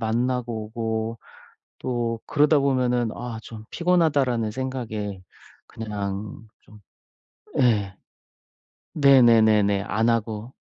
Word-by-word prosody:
만나고 120 0 -1
오고 110 0 -3 0.6
또 120 -2 -2
그러다 150 0 +3
보면은 125 -4 +1
'아 120 -2 -6
좀 110 -1 -10
피곤하다.'라는 145 -10 +1
생각에 110 -6 -4 0.4
그냥 105 0 -6
좀 105 - -17 0.8
예. 105 -6 +2 1.0
네네네네 110 -8 +5
안 110 +3 +1
하고 115 +1 -2
115 Hz, 190 characters per minute, -24 LUFS, 110-125 Hz, 1.0 s, 네네네네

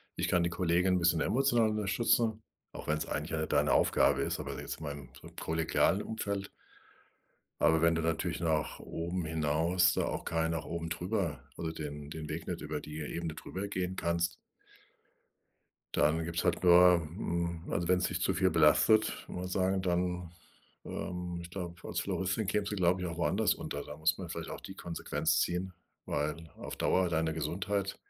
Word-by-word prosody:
ich - - -1
kann 90 -1 +3
die 85 - +1
Kollegin 90 +1 +2
'n - - +2
bisschen 85 -1 +3
emotional 120 -4 +3
unterstützen”, 110 +2 +1 0.3
auch - - -9
wenn's 75 +1 0
eigentlich 75 +2 -3
ja 80 - -1
nicht 80 - -2
deine - - +3
Aufgabe - - +4
ist, - - -1
aber - - -5
jetzt - - -6
mal 75 -2 -4
im 70 -3 -9 0.3
kollegialen 80 +4 +1
Umfeld. 100 -3 -3 1.1
Aber 80 -1 +4
wenn 85 0 +5
du 80 - 0
natürlich 80 0 -1
nach 80 -3 0
oben 85 +1 -3
hinaus 80 +3 +2
da - - +1
auch - - -3
kein 80 0 0
nach 80 -1 -2
oben 85 0 -4
drüber 90 - -2
also 80 -1 -3
den 75 -2 -6
den 75 -1 -6
Weg 80 +2 -5
nicht 90 - -3
über 75 0 -3
die 75 +1 -7
Ebene 80 +1 -4
darüber 100 +2 -5
gehen 95 -1 -3
kannst 85 0 0 1.6
dann 80 +2 +3
gibt's 85 0 -2
halt - - +1
nur 90 0 +8
hm, 85 0 -3
also, 85 0 0
wenn's 90 0 +3
dich - - -3
zu - - +2
viel 95 -1 +2
belastet, 85 +8 +4
mal 90 +1 -5
sagen, 95 +1 +1
dann, 90 -1 -1 0.5
ähm, 90 -1 -4
ich 85 - -9
glaube, 90 -2 -5
als - - -2
Floristin 95 +3 -1
kämst 105 +1 0
du, - - -1
glaube 90 -1 +2
ich, 90 - -1
auch 85 - -5
woanders 85 - +2
unter. 70 0 -5
Da 75 - -9
muss 80 +1 +2
man 90 -3 -6
vielleicht - - -5
auch - - -7
die - - -9
Konsequenz 85 -1 -1
ziehen, 90 +1 -1 0.3
weil 75 +2 -2
auf - - -6
Dauer 90 -1 +2
deine 80 -1 +1
Gesundheit 95 +6 -2
85 Hz, 180 wpm, -32 LUFS, 80-95 Hz, 1.6 s, nur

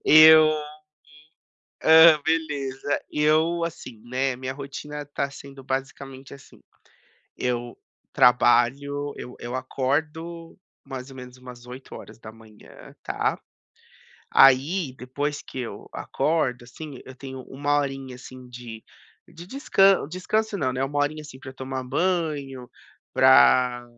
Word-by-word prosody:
Eu, 155 0 +8
hum, 155 -1 -2 1.2
hã, 160 -1 +8
beleza. 145 -4 -2
Eu, 160 +3 +2
assim, 130 -8 -8
né. 130 +1 -1
Minha 130 +1 -5
rotina 145 +1 -7
tá 140 -1 -3
sendo 140 0 -12
basicamente 135 0 -6
assim. 140 - -17 0.7
Eu 120 -1 -3 0.4
trabalho 135 +4 +3
eu 125 - -9
eu 120 +1 -6
acordo, 155 +6 -3 0.3
mais 130 -1 -8
ou 135 - -12
menos 125 -1 -11
umas 125 -1 -12
8h. 115 -3 -13
Tá. - - -2 0.9
Aí, 135 +3 +4
depois 145 +4 -4
que 130 - -8
eu 120 - -8
acordo, 135 -7 -1
assim, 140 +2 -10
eu 130 - -11
tenho 130 0 -9
1 145 +3 -1
horinha 135 -2 -4
assim 130 0 -12
de 120 -2 -10 0.5
de 170 +2 -12
descan 195 - +3
descanso 205 +5 -2
não, 130 -7 -1
né, 130 +1 -2
1 145 +1 -2
horinha, 150 +2 -1
assim, 145 -3 -12
pra 130 0 -10
eu 130 - -15
tomar 130 0 -5
banho 145 -6 -2 0.4
pra 120 - +5
135 Hz, 125 wpm, -24 LUFS, 125-155 Hz, 1.2 s, Eu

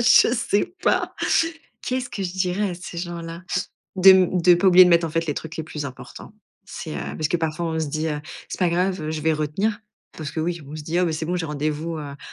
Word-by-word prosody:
je 235 +1 +6
sais 220 - 0
pas. - - +1 0.7
Qu'est 255 0 -1
ce 245 - -7
que 200 - -5
je 180 - -3
dirais 190 +2 0
à - - -4
ces 175 0 -9
gens-là? 170 -1 -6 0.5
De 190 0 +7
m 185 -1 +4
de 175 +1 +7
pas 175 +3 0
oublier 185 0 +9
de - - +4
mettre 170 -1 +4
en 160 - -3
fait 165 +1 0
les 150 - 0
trucs 160 0 -6
les 160 - -3
plus 150 -1 -6
importants. 130 +9 -10 0.3
C'est, 160 -5 -7
heu, - - -3 0.2
parce 155 - 0
que 175 - 0
parfois 160 +1 -2
on 160 0 -2
se 160 - 0
dit, 155 +2 -2
heu: 150 -2 -2 0.3
«C'est - - -5
pas 180 - +3
grave, 180 +2 0
heu, 155 0 -3
je 155 -1 -3
vais 160 +1 +2
retenir» 175 +9 -1 0.4
parce 150 -2 -5
que 160 - -4
oui, 170 +1 -2
on 150 - -8
se 155 - -6
dit: 165 +4 -1
«Oh 180 - +3
bah, 165 - 0
c'est 160 +1 -3
bon, 175 +3 -1
j'ai 175 -2 -2
rendez-vous 155 +2 -3
à 145 -2 -7
170 Hz, 265 wpm, -23 LUFS, 155-180 Hz, 0.7 s, oublier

